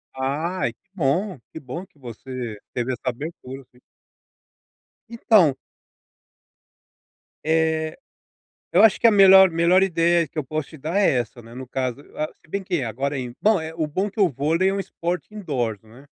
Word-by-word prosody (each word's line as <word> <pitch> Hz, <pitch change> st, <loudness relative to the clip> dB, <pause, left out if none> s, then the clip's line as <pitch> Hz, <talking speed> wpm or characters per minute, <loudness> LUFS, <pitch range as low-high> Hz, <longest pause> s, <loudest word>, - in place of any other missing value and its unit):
Ai 145 Hz, +2 st, -2 dB
que -, -, -49 dB
bom, 175 Hz, +3 st, 0 dB
que 160 Hz, -, -8 dB
bom 150 Hz, +7 st, -7 dB
que 190 Hz, -7 st, -30 dB
você 125 Hz, -2 st, -7 dB, 0.2 s
teve 125 Hz, +1 st, -2 dB
essa -, -, -8 dB
abertura 135 Hz, 0 st, -7 dB
assim. 125 Hz, -1 st, -24 dB, 1.3 s
Então 215 Hz, -, +4 dB, 1.9 s
Eh, 160 Hz, 0 st, 0 dB, 0.8 s
eu 185 Hz, -, +6 dB
acho 220 Hz, -3 st, +5 dB
que -, -, -1 dB
a -, -, +6 dB
melhor 190 Hz, -2 st, +8 dB
melhor 170 Hz, +3 st, +4 dB
ideia 170 Hz, -2 st, +2 dB
que 165 Hz, -, -16 dB
eu 155 Hz, -, 0 dB
posso 155 Hz, +2 st, -4 dB
te 155 Hz, -, -12 dB
dar 155 Hz, +7 st, -3 dB
é 205 Hz, -, +4 dB
essa, 120 Hz, +1 st, -6 dB
né, 115 Hz, +1 st, -14 dB
no 130 Hz, 0 st, -8 dB
caso. 130 Hz, +1 st, -3 dB
Ah, 155 Hz, -, -2 dB, 0.2 s
se 155 Hz, -, -24 dB
bem 200 Hz, +3 st, -3 dB
que 175 Hz, -6 st, -1 dB
agora 135 Hz, +5 st, -3 dB
é -, -, -2 dB
in 125 Hz, -1 st, -7 dB
bom, 215 Hz, 0 st, +4 dB, 0.2 s
o 160 Hz, -2 st, -1 dB
bom 190 Hz, +7 st, -2 dB
que 215 Hz, -, -10 dB
o 195 Hz, -3 st, +5 dB
vôlei 160 Hz, +7 st, +1 dB
é 195 Hz, -, -1 dB
um 200 Hz, -, -2 dB
esporte 175 Hz, 0 st, -4 dB
indoors, 125 Hz, -, -3 dB
né. 115 Hz, +6 st, -17 dB
155 Hz, 180 wpm, -23 LUFS, 130-185 Hz, 1.9 s, melhor